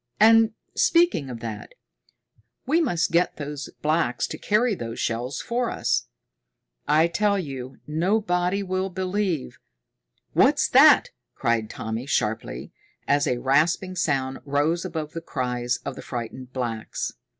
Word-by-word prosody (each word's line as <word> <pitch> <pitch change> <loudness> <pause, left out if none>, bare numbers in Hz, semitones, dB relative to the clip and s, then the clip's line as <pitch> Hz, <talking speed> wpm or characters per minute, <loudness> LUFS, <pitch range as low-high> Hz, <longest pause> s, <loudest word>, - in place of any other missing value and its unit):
And, 225 0 +6 0.2
speaking 335 - +3
of 120 -2 -7
that, 110 -3 -7 0.9
we 315 +6 +3
must 175 - 0
get 175 +1 +2
those 145 -1 -5
blacks 155 -5 +1
to - - -6
carry 215 +3 +2
those 115 -9 -6
shells 120 +4 -2
for 240 0 -1
us. - - 0 0.8
I 155 +2 +5
tell 200 +4 +1
you, 135 -7 -6
nobody 180 +3 0
will 185 0 -2
believe 185 -4 -2 0.4
" - - -58 0.3
"What's - - +4
that?" - - +7 0.2
cried 115 -2 0
Tommy 110 +4 -5
sharply, 110 -5 -2 0.4
as 145 0 +2
a 125 - +1
rasping 155 +8 +1
sound 135 -6 -1
rose 150 +5 0
above 160 -4 -4
the 165 - -5
cries 125 -4 -2
of - - -4
the - - -8
frightened 125 +1 -6
blacks. 120 -4 -3
150 Hz, 135 wpm, -24 LUFS, 125-185 Hz, 0.9 s, that